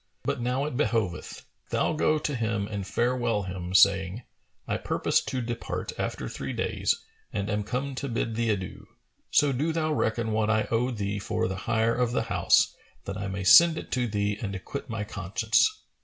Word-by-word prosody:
But 140 -3 -1
now 125 +3 0
it 150 - -4
behoveth, 110 -8 -1 0.2
thou - - +1
go 155 0 +2
to 150 -1 -2
him 110 -4 -1
and 100 -2 -4
farewell 120 -2 0
him, 90 -1 -5
saying, 95 +3 +4 0.4
'I - - 0
purpose - - +1
to 130 - -2
depart 120 0 -4
after 65 - -3
three - - -5
days - - 0 0.3
and 100 0 -2
am 105 0 0
come 130 +6 -3
to 135 +1 -4
bid 115 -1 -1
thee 115 0 0
adieu; 95 -4 -3 0.4
so 145 -1 +4
do 145 +6 0
thou 155 -1 0
reckon 115 -4 0
what 110 0 +1
I 110 -1 +2
owe 120 +2 +2
thee 105 -4 -2
for 100 - -1
the 95 - -3
hire 115 0 +3
of 120 0 0
the 120 - +1
house - - +4 0.3
that 100 - -4
I 100 - -3
may 95 0 -4
send 165 - +8
it - - -7
to 125 -2 +1
thee 105 -1 -1
and 100 -3 -3
acquit 135 +8 -6
my 110 -2 -2
conscience.' 105 - +2
115 Hz, 190 wpm, -27 LUFS, 100-125 Hz, 0.4 s, send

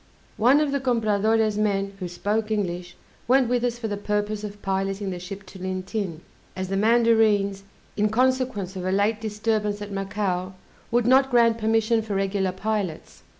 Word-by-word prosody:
One 250 +6 +5
of 300 -2 +1
the 280 - 0
Compradore's 220 -3 +1
men 200 -2 0
who 180 - -3
spoke 210 +5 -2
English 180 -4 -2 0.3
went 260 0 +4
with 245 0 0
us 240 -1 0
for 235 -2 -4
the 205 -1 -3
purpose 210 +1 -2
of 205 0 -7
piloting 195 0 -1
the 180 - -5
ship 195 +2 -8
to 190 +1 -12
Lintin, 185 -1 -4 0.3
as 185 0 -4
the 195 - -1
Mandarines, 215 -2 +3 0.3
in 210 0 +2
consequence 250 -5 0
of 185 - -5
a 185 - -1
late 205 +3 +1
disturbance 210 -1 -1
at 205 0 -7
Macao, 195 -2 -2 0.3
would 240 -1 +2
not 265 +2 +5
grant 230 -2 +4
permission 225 +1 +2
for 215 -2 -4
regular 195 -1 0
pilots. 195 -3 -4
210 Hz, 170 wpm, -24 LUFS, 195-225 Hz, 0.3 s, One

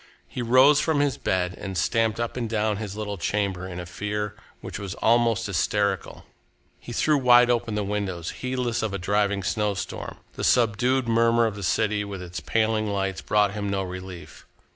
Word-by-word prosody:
He 125 - -5
rose 130 +5 +6
from 155 -1 +1
his 145 -3 +1
bed 90 -1 0
and 95 -2 -5
stamped 115 +2 +1
up 120 -1 -2
and 120 -3 -3
down 110 -1 0
his 105 -2 -5
little 105 -3 -4
chamber 95 0 -1
in 90 -1 -6
a 90 - -5
fear 105 +3 -3 0.3
which - - -7
was 100 -3 -5
almost 115 0 +2
hysterical. 100 0 -1 0.5
He - - -10
threw 150 -2 +2
wide 125 -1 +6
open 115 -2 -1
the 105 - 0
windows, 95 -4 -3
heedless 125 -2 -1
of 105 -3 -2
a - - -1
driving 100 +1 0
snowstorm. 105 -1 -2 0.2
The - - -6
subdued 125 +2 +2
murmur 115 0 +3
of 110 - -1
the 100 - -7
city, 105 +3 +1
with 100 -2 -6
its 90 -1 -6
paling 110 +5 0
lights, 95 -2 -2
brought 105 -1 +2
him 105 -1 -3
no 100 -1 -1
relief. 90 -1 -9
105 Hz, 185 wpm, -25 LUFS, 95-115 Hz, 0.5 s, rose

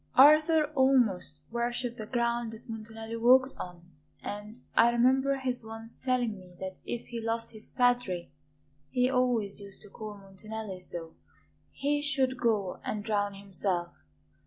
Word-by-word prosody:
Arthur 305 +3 +7
almost 245 - +3
worshipped 240 0 -1
the 215 - -5
ground 235 -1 0
that 225 +3 -11
Montanelli 225 0 -6
walked 260 +3 +5
on, 175 -1 -7 0.4
and 210 +3 -6
I 235 - +6
remember 260 +3 +3
his 255 -3 -1
once 225 +1 -8
telling 245 -5 0
me 180 -1 -15
that 190 0 -6
if 240 - -4
he 235 -1 -4
lost 230 0 -1
his 215 -1 -7
'Padre' 245 - +1 0.6
he 250 +1 +2
always 245 -6 +1
used 200 0 -10
to 205 - -13
call 215 +1 -7
Montanelli 200 0 -7
so 170 -2 -4 0.6
he 290 +1 0
should 265 -3 +1
go 210 -6 +1
and 210 -1 -3
drown 205 -2 0
himself. 190 -3 -2
225 Hz, 145 wpm, -30 LUFS, 205-250 Hz, 0.6 s, Arthur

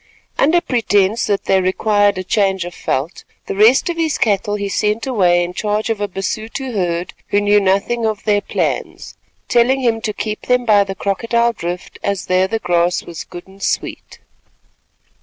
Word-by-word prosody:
Under 335 +5 +4
pretence 220 - +1
that 200 -2 -1
they 190 -1 +3
required 205 +2 +2
a 185 - -3
change 190 -2 +1
of 175 - -7
veldt, 145 +2 -3 0.2
the - - -4
rest 220 +7 +5
of 345 -1 -2
his 320 -3 0
cattle 205 -1 +1
he 200 -1 -3
sent 210 +3 0
away 180 -9 +3
in 175 +1 -5
charge 210 +3 -1
of 215 -2 -3
a 205 - 0
Basuto 220 +7 -4
herd 175 -3 -2
who 205 - +2
knew 205 0 +4
nothing 200 +4 +1
of 215 -2 -3
their 205 -1 +2
plans, - - -3 0.3
telling 250 +3 +3
him 230 -3 +1
to 215 - -2
keep 215 +1 -5
them 250 -1 +2
by 210 -3 +5
the 195 -1 -6
Crocodile 230 +5 0
Drift, 175 -3 -6
as 200 -2 -2
there 185 +1 +2
the 225 - -1
grass 175 -3 +1
was 170 -2 -8
good 175 0 -11
and 195 +1 -17
sweet. - - -3
205 Hz, 180 wpm, -18 LUFS, 190-225 Hz, 0.3 s, rest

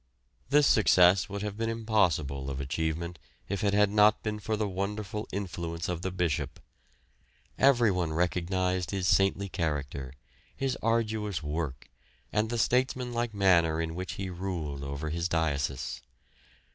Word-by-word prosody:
This 145 +1 +5
success 95 -5 +5
would 100 +1 -4
have 105 -1 -3
been 115 +1 -2
impossible 85 -12 0
of 70 0 -4
achievement 80 +4 -3 0.3
if 100 +2 -3
it 100 -1 +2
had 105 -1 +4
not 105 0 +4
been 105 -1 -2
for 110 +2 -2
the 105 -1 0
wonderful 100 +2 -3
influence 85 -3 -4
of 90 -1 -3
the 95 - -2
Bishop. 90 -5 -2 1.0
Everyone 110 - +3
recognised 90 +2 0
his 95 -2 -1
saintly 95 +1 +3
character, 70 -7 -3 0.4
his 135 -1 -1
arduous 110 -6 0
work, 75 -4 -4 0.5
and 105 +1 +1
the 120 - -2
statesmanlike 120 -1 0
manner 85 -5 +4
in 80 0 -2
which 90 +2 -4
he 95 -1 -5
ruled 85 -6 -4
over 70 +3 -4
his 85 +2 -1
diocese. 70 -5 -1
95 Hz, 140 wpm, -29 LUFS, 80-105 Hz, 1.0 s, This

